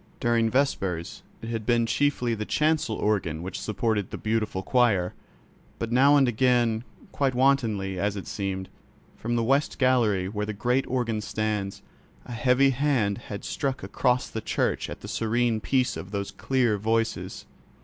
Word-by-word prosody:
During 115 -1 +2
vespers 95 -10 -1 0.2
it 115 - -5
had 115 -2 -3
been 120 +1 +2
chiefly 125 -1 +1
the 110 -1 -3
chancel 150 -2 +1
organ 90 -8 -1
which 90 0 -5
supported 110 -2 -1
the - - -6
beautiful 110 -3 -1
choir, 105 -7 +2 0.6
but 115 0 -4
now 140 +4 +6
and 135 -2 +4
again, 120 -1 +2 0.3
quite 135 -3 0
wantonly 115 -8 +1
as 100 +2 0
it 100 - -6
seemed, 95 -2 -3 0.5
from 120 +2 -3
the 115 - +1
west 135 +5 +1
gallery 115 -8 +2
where 105 +1 -3
the 105 - -3
great 125 +6 0
organ 115 -4 -1
stands, 105 -2 -3 0.4
a - - -10
heavy 125 +3 +3
hand 125 -7 +1
had 100 -2 -6
struck 135 -1 -2
across 125 -1 +1
the 110 - -5
church - - -1
at - - -8
the - - -8
serene 115 0 0
peace 130 +1 +1
of 95 - -7
those 100 -1 -3
clear 125 -6 +1
voices. 115 +2 -1
115 Hz, 160 wpm, -26 LUFS, 105-125 Hz, 0.6 s, now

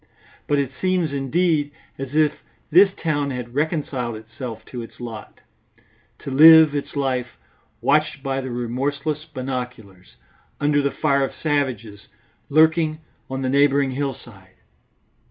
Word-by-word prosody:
But 145 - +2
it 140 -2 -1
seems, 185 -5 0
indeed, 145 +2 +1 0.3
as 135 +1 -6
if 155 -1 +2 0.3
this 190 +5 +7
town 145 -3 -1
had 125 -2 -6
reconciled 140 -5 -2
itself 110 +1 -8
to 125 - -7
its 115 - -12
lot, 115 -3 -9 0.8
to 140 - -8
live 160 +2 +8
its 145 0 -4
life 130 -3 -2 0.4
watched 150 -1 +1
by 135 -1 -2
the 130 - -6
remorseless 140 +6 -3
binoculars, 125 - -7 0.4
under 145 0 +2
the 140 - +1
fire 140 -1 +1
of 135 - -3
savages 125 -9 -2 0.4
lurking 155 +1 +3 0.3
on 130 0 -4
the 130 - 0
neighbouring 140 0 +3
hillside. 120 -8 -6
140 Hz, 130 wpm, -22 LUFS, 125-150 Hz, 0.8 s, live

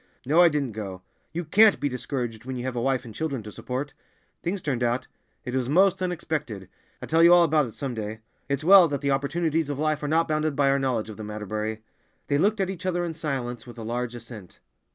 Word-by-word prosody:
"No, 155 +6 +5
I 175 - +7
didn't 145 -5 -1
go. 95 -4 -7 0.3
You 170 +1 -4
can't 210 +6 +5
be 145 - 0
discouraged 125 -3 -4
when 130 +1 -5
you 125 - -4
have 130 -1 -3
a 120 - -1
wife 130 0 0
and 115 - -9
children 140 -6 -3
to 105 - -8
support. 130 +7 -5 0.5
Things 185 +2 -3
turned 130 -5 -1
out—it 125 +1 -4
was 130 -1 -1
most 185 +5 +4
unexpected. 150 - -3 0.3
I'll - - -5
tell 160 +1 +3
you 170 +1 +8
all 175 0 +8
about 155 -4 +2
it 110 - -11
some 135 -3 -4
day. 110 0 -5 0.3
It's 140 +1 -1
well 185 0 +8
that 145 -2 -3
the 140 -1 +1
opportunities 155 +3 0
of 145 - -3
life 155 0 0
are 150 - -2
not 165 +2 +2
bounded 155 -1 0
by 140 -1 +3
our 140 - +2
knowledge 120 -5 -1
of 105 - -11
them, 105 -1 -7
Atterbury." 110 +1 -4 0.5
They 145 - +2
looked 210 +5 +2
at 190 -1 0
each 185 0 -6
other 175 -1 0
in 165 - -4
silence 130 -7 -4
with 120 - -11
a 115 - -6
large 120 +1 -3
assent. 115 -6 -11
140 Hz, 235 wpm, -26 LUFS, 120-160 Hz, 0.5 s, you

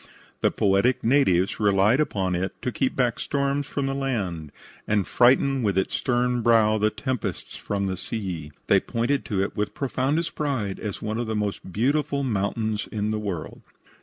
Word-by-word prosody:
The - - +3
poetic 100 +6 +2
natives 110 -8 +3
relied 105 +4 +4
upon 95 -11 0
it 90 +2 -3
to 125 - -1
keep 130 +4 -1
back 125 -3 +1
storms 140 0 -1
from 140 -2 -2
the 135 - -1
land 100 - -2 0.4
and 105 -3 +2
frighten, 135 +2 +3
with 100 -4 0
its 95 - 0
stern 125 0 +1
brow, 110 -2 +4
the 105 +1 +3
tempests 125 +2 -4
from 100 -1 -2
the 95 -1 -2
sea. 90 -9 -5
They - - +5
pointed 120 +4 -1
to 100 -5 0
it 100 - -4
with 105 0 -2
profoundest 145 +4 -1
pride 125 -10 -2
as 105 -3 -5
one 110 +1 -2
of 120 - -2
the 110 - -2
most 105 -2 -3
beautiful 140 - +1
mountains 110 -1 -1
in 105 0 -1
the 110 - -1
world. 95 -7 -5
110 Hz, 175 wpm, -25 LUFS, 100-130 Hz, 0.4 s, They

